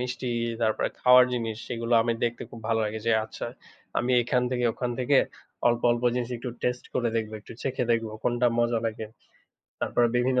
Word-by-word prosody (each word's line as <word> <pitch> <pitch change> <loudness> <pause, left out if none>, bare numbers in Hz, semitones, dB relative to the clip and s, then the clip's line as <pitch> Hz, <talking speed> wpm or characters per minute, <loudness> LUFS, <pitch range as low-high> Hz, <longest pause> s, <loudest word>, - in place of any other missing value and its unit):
মিষ্টি, 125 0 -3 0.3
তারপরে 110 -1 +1
খাওয়ার 125 0 +8
জিনিস 115 -3 -2
সেগুলা 115 0 -1
আমি 115 +1 +1
দেখতে 120 0 -2
খুব 115 - -10
ভালো 115 -1 +2
লাগে 110 +1 -3
যে 115 - +4
আচ্ছা, 110 - -6 0.5
আমি 125 +1 0
এখান 125 +1 +1
থেকে 125 -1 0
ওখান 125 +1 -3
থেকে 135 +2 +4 0.5
অল্প, 120 0 +1
অল্প 120 0 -2
জিনিস 125 0 -2
একটু 120 +1 -5
টেস্ট 125 0 -1
করে 120 -1 +1
দেখবো, 110 -1 -2
একটু - - -12
চেখে 130 -2 -1
দেখবো, 115 -1 -1
কোনটা 120 0 +2
মজা 120 -1 +2
লাগে। 110 0 -4 0.7
তারপরে 120 - +2
বিভিন্ন 125 +1 +2
120 Hz, 185 wpm, -27 LUFS, 115-125 Hz, 0.7 s, খাওয়ার